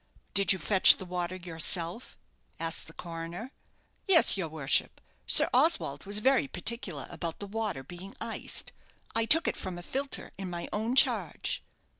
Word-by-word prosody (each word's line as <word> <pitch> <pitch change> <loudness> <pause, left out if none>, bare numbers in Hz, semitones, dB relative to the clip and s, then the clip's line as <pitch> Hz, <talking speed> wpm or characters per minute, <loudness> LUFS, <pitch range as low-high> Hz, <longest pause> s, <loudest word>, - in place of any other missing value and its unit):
"Did 200 -3 +3
you 190 - +1
fetch 190 +3 +7
the 190 - -9
water 180 0 -4
yourself?" 170 +3 +1 0.4
asked 165 -1 -2
the 160 - -12
coroner. 170 +9 -8 0.6
"Yes, 365 -4 +7
your 185 -5 -4
worship 150 -3 -1 0.3
Sir - - +5
Oswald 145 - +1
was 200 +1 -5
very 265 +5 +1
particular 210 - -3
about 170 -2 -6
the 205 - -8
water 205 -8 -5
being 175 +7 -11
iced - - 0 0.4
I 225 0 +1
took 325 +8 +4
it - - -1
from 185 -2 -7
a 175 - -10
filter 275 +7 -6
in 190 -2 -6
my 175 -1 -6
own 225 +4 -2
charge." - - +1
185 Hz, 160 wpm, -28 LUFS, 170-225 Hz, 0.6 s, fetch